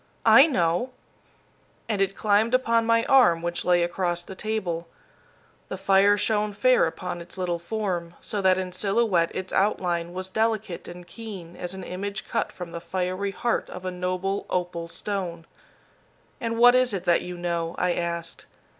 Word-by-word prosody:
"I 275 +4 +8
know." 175 - +1 1.0
And 210 -3 -1
it 195 0 +1
climbed 215 +3 +2
upon 230 -3 +2
my 230 0 +3
arm 245 -12 +5
which 175 0 -2
lay 175 -1 +3
across 175 0 -1
the 190 - -9
table. 185 -5 -3 0.8
The 190 - -4
fire 195 +1 +4
shone 210 0 0
fair 255 -1 +4
upon 175 +1 -5
its 170 - -7
little 175 -2 -1
form, 175 -3 -3
so 205 - -3
that 185 -1 +4
in 185 -1 -3
silhouette 195 -2 +1
its 185 0 -4
outline 175 -4 0
was 185 +1 -4
delicate 220 -2 -1
and 175 0 -9
keen 180 -3 -9
as 180 +1 -6
an 190 - -7
image 195 +2 -5
cut - - -1
from 180 -2 -8
the 170 0 -6
fiery 185 +2 -2
heart 235 +4 -1
of 180 +1 -8
a 185 - -2
noble 185 +2 -2
opal 175 -2 -2
stone. 175 -2 -4 0.9
"And 230 -1 -2
what 245 +1 +7
is 255 -4 +3
it 185 - -4
that 175 -2 +3
you 180 0 -7
know?" 170 -1 -2
I 180 -1 +1
asked. 170 -1 -4
185 Hz, 170 wpm, -25 LUFS, 175-210 Hz, 1.0 s, I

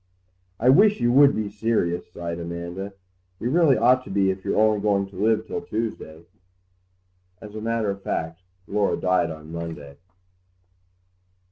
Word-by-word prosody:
"I 125 - +3
wish 205 +10 +5
you 120 0 +2
would 140 +2 +6
be 110 -1 -2
serious," 100 -5 -1
sighed 85 -1 -5
Amanda; 85 +3 -6 0.5
"you 120 - -2
really 160 -4 +4
ought 125 +3 +4
to - - -10
be 95 -1 +2
if 95 0 -7
you're - - -1
only 110 -1 +3
going 100 -1 +1
to 95 - -16
live 110 +1 +1
till - - -4
Tuesday." 110 -8 -5 1.1
As 105 -1 -11
a 110 - -6
matter 115 -2 -1
of 100 0 -7
fact 80 -1 -4 0.3
Laura 100 0 0
died 90 -2 +1
on 80 0 -9
Monday. 80 -4 -7
100 Hz, 155 wpm, -24 LUFS, 85-115 Hz, 1.1 s, would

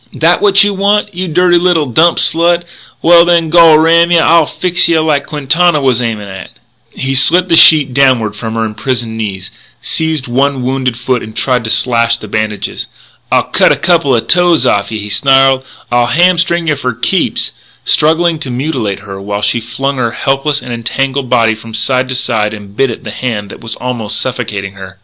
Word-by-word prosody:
That 165 +3 +1
what 200 0 +5
you 205 0 0
want 205 +1 0
you 185 +1 -4
dirty 175 +1 +2
little 175 -3 +1
dump 160 +7 +2
slut? 170 +1 +1 0.4
Well, 170 0 +6
then, 170 -2 +1
gol 165 -2 +6
ram 165 +2 +3
yeh 175 - +3
I'll 165 -2 +3
fix 180 -1 0
yeh 165 -1 +2
like 150 -3 -1
Quintana 155 +3 +1
was 130 -3 0
aimin' 110 -4 -4
at 95 0 -9 0.3
" - - -43
He 135 0 -4
slit 170 +7 +3
the 165 - +4
sheet 150 -5 +6
downward 125 -6 +1
from 110 +1 -6
her 115 0 -1
imprisoned 110 +1 -4
knees, 100 -4 -6 0.3
seized 160 -4 -2
one 135 +1 -1
wounded 130 -2 -2
foot 125 0 -2
and 110 0 -10
tried 125 -3 0
to - - -3
slash 115 0 +1
the 110 - -10
bandages. 110 0 -4 0.4
"I'll - - +3
cut - - +2
a - - +3
coupla 145 -9 +1
toes 175 +1 +2
off'n 100 +2 0
yeh," 105 - -6
he 105 - -6
snarled, 135 +2 +2 0.2
" - - -28
I'll 120 0 +2
hamstring 175 +2 +1
yeh 155 - +2
fur 130 -3 -3
keeps!" 170 - -1 0.3
struggling 165 +1 +1
to 140 - -6
mutilate 120 -7 -3
her 100 -1 -9
while 100 +1 -5
she 115 +3 0
flung 135 +4 -4
her 120 -2 -2
helpless 140 +2 -1
and 125 - -6
entangled 130 +3 -3
body 115 -2 +2
from 110 0 -10
side 130 +3 0
to 130 - -3
side 110 -5 -2
and 100 -1 -13
bit 135 +4 +1
at 115 - -7
the 105 - -7
hand 105 -4 -5
that - - -12
was 115 -1 -3
almost 120 -4 -3
suffocating 110 -6 -4
her. 95 -1 -12
130 Hz, 200 wpm, -11 LUFS, 115-165 Hz, 0.4 s, Well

